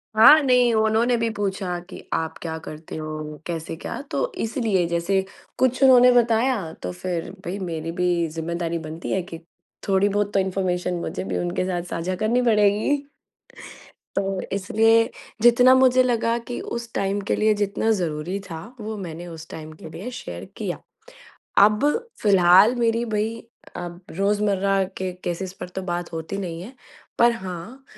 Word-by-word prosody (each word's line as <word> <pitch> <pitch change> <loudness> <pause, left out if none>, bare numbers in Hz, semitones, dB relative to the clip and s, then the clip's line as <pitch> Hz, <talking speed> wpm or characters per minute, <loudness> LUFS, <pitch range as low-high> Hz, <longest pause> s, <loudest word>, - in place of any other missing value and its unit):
हाँ, 295 +8 +9
नहीं 250 -3 +4
उन्होंने 220 +3 +3
भी 230 0 0
पूछा 195 -4 -2
कि - - -10
आप 160 0 -2
क्या 160 -1 -4
करते 155 +1 -8
हो, 155 -1 -6
कैसे 165 -1 -4
क्या? - - -6
तो - - -1
इसीलिए 220 -6 0
जैसे 170 +3 +1 0.4
कुछ 255 +1 +1
उन्होंने 250 -1 +8
बताया, 235 -6 +2
तो 90 - -6
फिर 175 - -4 0.2
भई 185 +3 -3
मेरी 165 -3 -4
भी 175 -1 +1
ज़िम्मेदारी 170 +1 -3
बनती 160 +1 -6
है 190 - +1
कि 165 -2 -8 0.5
थोड़ी 195 +1 +3
बहुत 205 0 -1
तो - - +3
इंफ़ॉर्मेशन 185 -1 -1
मुझे 90 - -4
भी 95 -2 -3
उनके 90 - -1
साथ 180 -2 -1
साझा 185 +3 -2
करनी 220 +5 +1
पड़ेगी। 220 +5 +2 1.1
तो, 195 -1 -1
इसलिए 225 +4 +3 0.3
जितना 245 +2 +7
मुझे 255 -1 +5
लगा 235 -1 +1
कि 245 - -3 0.2
उस 235 -1 -8
टाइम 200 +1 0
के - - +3
लिए 215 0 +3
जितना 205 +2 -1
ज़रूरी 175 -1 -2
था, 160 -1 -6 0.2
वो 215 0 -5
मैंने 175 -2 -7
उस 165 -1 -9
टाइम 155 0 -8
के 160 - -8
लिए 175 +10 -7
शेयर - - -7
किया। - - -3 0.9
अब 210 +6 +3 0.4
फ़िलहाल 195 +3 +6
मेरी 230 0 +1
भई 215 -1 -1 0.5
अब 175 0 -6
रोज़मर्रा 195 0 +1 0.2
के 185 -1 -2
केसेज़ 180 +2 -3
पर - - -5
तो 190 +1 -6
बात 175 -1 -4
होती 160 +4 -4
नहीं 170 -3 -4
है, 245 +7 -10 0.4
पर 235 0 +6
हाँ, 190 +6 -7
195 Hz, 160 wpm, -23 LUFS, 170-225 Hz, 1.1 s, हाँ